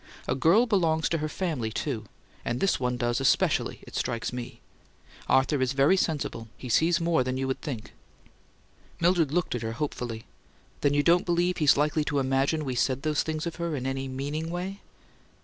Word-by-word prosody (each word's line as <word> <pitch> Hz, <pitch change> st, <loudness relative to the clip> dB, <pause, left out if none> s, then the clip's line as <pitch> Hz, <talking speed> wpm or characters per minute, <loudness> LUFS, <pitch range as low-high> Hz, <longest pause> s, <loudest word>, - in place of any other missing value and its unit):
A -, -, +1 dB
girl 165 Hz, -, +4 dB
belongs 165 Hz, -8 st, +2 dB
to 165 Hz, -, 0 dB
her 155 Hz, 0 st, -2 dB
family, 150 Hz, -11 st, -2 dB
too -, -, -3 dB, 0.4 s
and 120 Hz, +1 st, -2 dB
this 195 Hz, -, +2 dB
one 125 Hz, -1 st, -1 dB
does 120 Hz, +1 st, 0 dB
especially, 135 Hz, -, +2 dB
it -, -, -11 dB
strikes 120 Hz, 0 st, -2 dB
me! 125 Hz, -1 st, -6 dB, 0.7 s
Arthur's 130 Hz, -1 st, +3 dB
very 140 Hz, +7 st, +4 dB
sensible; 145 Hz, -10 st, -2 dB
he 125 Hz, -, -8 dB
sees 165 Hz, +8 st, +3 dB
more 165 Hz, -5 st, +2 dB
than 130 Hz, +1 st, -2 dB
you'd 130 Hz, 0 st, -2 dB
think." 125 Hz, -7 st, -6 dB, 1.1 s
Mildred 170 Hz, -4 st, +3 dB
looked 175 Hz, +2 st, 0 dB
at 120 Hz, -, -3 dB
her 115 Hz, 0 st, -3 dB
hopefully. 120 Hz, -4 st, -4 dB, 0.5 s
"Then 145 Hz, 0 st, +2 dB
you 145 Hz, -, +3 dB
don't 175 Hz, +3 st, +4 dB
believe 175 Hz, +1 st, +1 dB
he's 150 Hz, -5 st, +5 dB
likely 150 Hz, +1 st, +2 dB
to 145 Hz, -, -1 dB
imagine 135 Hz, +3 st, +1 dB
we 130 Hz, -, -2 dB
said 130 Hz, +2 st, 0 dB
those 155 Hz, -1 st, +1 dB
things 155 Hz, 0 st, -3 dB
of 170 Hz, -, -4 dB
her 170 Hz, -2 st, -2 dB
in 130 Hz, -2 st, -4 dB
any 135 Hz, 0 st, -2 dB
meaning 145 Hz, +5 st, -3 dB
way?" 185 Hz, +3 st, -4 dB
145 Hz, 185 wpm, -27 LUFS, 130-165 Hz, 1.1 s, he's